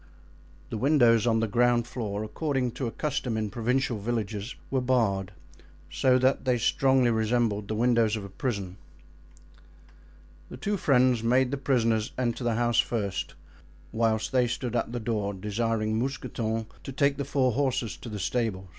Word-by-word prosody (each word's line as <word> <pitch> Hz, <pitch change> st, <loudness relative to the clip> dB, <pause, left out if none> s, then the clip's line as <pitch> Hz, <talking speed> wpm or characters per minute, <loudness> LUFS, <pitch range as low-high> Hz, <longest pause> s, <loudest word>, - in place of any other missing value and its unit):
The 110 Hz, -, -3 dB
windows 120 Hz, -5 st, +4 dB
on 115 Hz, -1 st, +2 dB
the 115 Hz, -, +1 dB
ground 120 Hz, +2 st, +2 dB
floor, 105 Hz, -4 st, -4 dB
according 130 Hz, +2 st, -1 dB
to 130 Hz, +1 st, -4 dB
a -, -, -4 dB
custom 135 Hz, -6 st, -2 dB
in 110 Hz, -2 st, -2 dB
provincial 125 Hz, 0 st, 0 dB
villages, 110 Hz, 0 st, -3 dB, 0.2 s
were 135 Hz, -1 st, +1 dB
barred, 105 Hz, -7 st, +1 dB, 0.6 s
so 130 Hz, -1 st, +3 dB
that 130 Hz, +1 st, +2 dB
they 125 Hz, -2 st, +2 dB
strongly 130 Hz, +1 st, +3 dB
resembled 110 Hz, -2 st, 0 dB
the 110 Hz, -, -2 dB
windows 115 Hz, -1 st, +2 dB
of 105 Hz, -2 st, -5 dB
a -, -, -9 dB
prison. 100 Hz, -4 st, -4 dB, 1.7 s
The -, -, -8 dB
two 205 Hz, +10 st, -1 dB
friends 125 Hz, -, +3 dB
made 125 Hz, +2 st, +2 dB
the 140 Hz, -, -1 dB
prisoners 115 Hz, -5 st, +1 dB
enter 125 Hz, 0 st, -1 dB
the 120 Hz, -1 st, +1 dB
house 120 Hz, 0 st, +2 dB
first, 105 Hz, -5 st, -1 dB, 0.6 s
whilst 110 Hz, -1 st, 0 dB
they 125 Hz, -2 st, +3 dB
stood 120 Hz, 0 st, -3 dB
at 115 Hz, -1 st, -1 dB
the 120 Hz, -, -3 dB
door, 105 Hz, -3 st, -2 dB
desiring 110 Hz, +2 st, -1 dB
Mousqueton 115 Hz, -3 st, -2 dB, 0.2 s
to -, -, -6 dB
take 140 Hz, +1 st, +1 dB
the 140 Hz, -, -2 dB
four 130 Hz, -2 st, +1 dB
horses 130 Hz, -3 st, -1 dB
to 120 Hz, -, -9 dB
the 105 Hz, -, -5 dB
stable. 100 Hz, -3 st, -2 dB
120 Hz, 165 wpm, -27 LUFS, 110-130 Hz, 1.7 s, windows